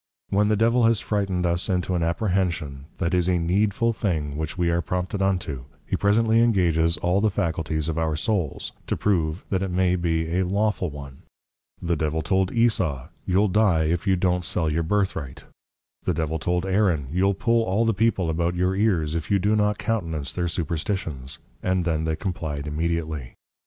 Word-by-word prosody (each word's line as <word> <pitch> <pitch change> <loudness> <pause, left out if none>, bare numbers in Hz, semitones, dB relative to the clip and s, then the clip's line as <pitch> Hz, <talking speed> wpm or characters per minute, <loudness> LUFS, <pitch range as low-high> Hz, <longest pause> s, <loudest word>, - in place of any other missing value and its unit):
When 105 +1 +2
the 105 - +3
Devil 115 +3 +3
has 115 -2 +3
frighted 95 -4 -1
us 85 +3 0
into 90 -1 0
an 90 - 0
Apprehension, 85 -5 -1
that 85 0 -1
it - - +4
is 90 +1 +1
a 90 - +3
Needful 100 +7 +1
thing 80 -10 -2
which 80 +2 -4
we 85 -2 +1
are 85 +1 +1
prompted 90 +3 -3
unto, 90 -10 -1 0.2
he - - -1
presently 110 +2 +3
Engages 85 -8 +3
all 90 +5 +1
the 110 - +3
Faculties 80 -4 -1
of 80 0 -1
our 80 -1 0
Souls, 90 - -2 0.2
to - - -1
prove, 85 -4 0
that 95 -1 +1
it 95 - -1
may 90 0 +2
be 85 0 0
a - - +2
Lawful 100 0 0
one; 70 -2 -10 0.6
the 85 0 -1
Devil 80 +1 -1
told 95 +3 +1
Esau, 95 - +1 0.2
You'll 95 +3 +3
dye 95 -5 +3
if 85 +5 -1
you 95 - +4
don't 90 0 +1
sell 80 -1 -1
your 80 +2 0
Birthright; 85 -6 -2 0.6
the 90 - -1
Devil 80 0 -1
told 90 +3 0
Aaron, 95 -7 +1
You'll 95 +3 +2
pull 115 +2 +2
all 110 +2 +1
the 115 - +2
people 105 -4 +1
about 85 +2 0
your 90 +1 +1
ears, 90 -7 +1
if 80 -1 -3
you 100 - +4
do 105 +3 +2
not 105 -1 +2
countenance 85 -10 -2
their 90 -1 -1
superstitions; 80 - -3 0.2
and 95 -2 0
then 80 -2 0
they 80 0 0
comply'd 80 -5 -4
immediately. 80 -3 -3
90 Hz, 190 wpm, -24 LUFS, 80-100 Hz, 0.6 s, it